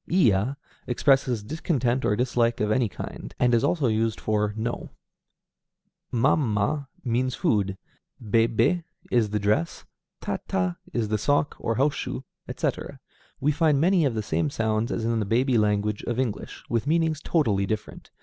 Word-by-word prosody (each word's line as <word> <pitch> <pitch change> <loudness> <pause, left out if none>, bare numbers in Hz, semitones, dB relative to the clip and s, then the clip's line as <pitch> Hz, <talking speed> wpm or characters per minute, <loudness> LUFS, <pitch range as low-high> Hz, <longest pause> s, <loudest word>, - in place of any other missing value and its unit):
Iya 125 - +3 0.3
expresses 125 -3 +2
discontent 130 - -1
or 105 - +2
dislike 120 0 +1
of 105 0 +1
any 115 0 +2
kind, - - -8
and 125 -1 +3
is 115 - +3
also 160 -6 +1
used 110 -1 +1
for 105 -1 0
"no"; 115 +2 -3 1.2
mam 125 -1 +2
ma 140 +8 0 0.2
means 125 0 0
food; 100 -3 0 0.4
bé 115 0 +2
bé 165 +9 +1 0.3
is 115 -4 +3
the 105 - -1
dress; 105 - 0 0.3
ta - - -3
ta 90 -2 0
is 115 -3 -1
the 110 0 0
sock, 145 +6 +1
or 115 - -1
house 140 +4 +2
shoe, 130 - -4 0.2
etc. - - -3 0.4
We 145 +3 +2
find 150 -2 +2
many 175 +2 +4
of 135 -5 +1
the 110 - -1
same 80 -5 0
sounds 110 +4 -1
as 115 - -2
in 115 0 +1
the - - +1
baby 120 +4 +2
language 105 0 +1
of 120 - -2
English, 120 -6 -3
with 115 +3 -1
meanings 160 -1 +1
totally 105 - +1
different. 110 +1 -5
115 Hz, 165 wpm, -25 LUFS, 105-135 Hz, 1.2 s, many